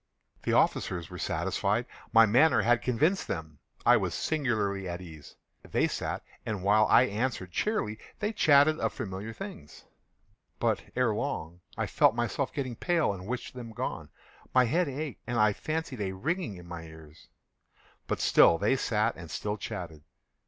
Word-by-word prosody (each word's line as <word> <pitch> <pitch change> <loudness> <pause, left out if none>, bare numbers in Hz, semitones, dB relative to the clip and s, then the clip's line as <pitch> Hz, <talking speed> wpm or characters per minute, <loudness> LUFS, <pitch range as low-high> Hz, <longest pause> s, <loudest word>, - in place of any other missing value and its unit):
The - - -1
officers 85 -3 +1
were - - -7
satisfied. 105 +5 0 0.3
My 115 0 +7
manner 125 +9 +4
had 120 +1 +3
convinced 155 - +1
them. 80 -5 -5 0.3
I - - +7
was - - -2
singularly 105 - -1
at 85 0 -4
ease. 80 -5 -12 0.3
They - - 0
sat, - - -3 0.2
and 105 -4 -4
while 105 +2 +4
I - - +6
answered 110 -5 -2
cheerily, 110 - -1 0.2
they 215 +1 -2
chatted 155 -3 +5
of - - -1
familiar 100 +3 -5
things. 195 - -9 0.7
But, - - +1
ere 125 -4 +2
long, 85 -4 -4 0.2
I - - 0
felt - - +3
myself 120 +2 -1
getting 130 -4 -3
pale 170 - +1
and 95 0 -9
wished 125 +2 -4
them 120 -3 -8
gone. - - -4 0.5
My 130 -1 +6
head 165 +6 +1
ached, 140 0 -5
and 120 -1 -1
I 105 -1 +4
fancied 155 -3 -4
a 95 -1 -2
ringing 150 - -2
in 90 -1 -12
my 85 -1 -6
ears: 80 -1 -14 0.8
but - - -1
still 85 - +6
they 105 +9 +2
sat 110 -1 0
and 85 - -10
still 105 +6 -3
chatted. 90 -7 -6
110 Hz, 165 wpm, -29 LUFS, 95-135 Hz, 0.8 s, My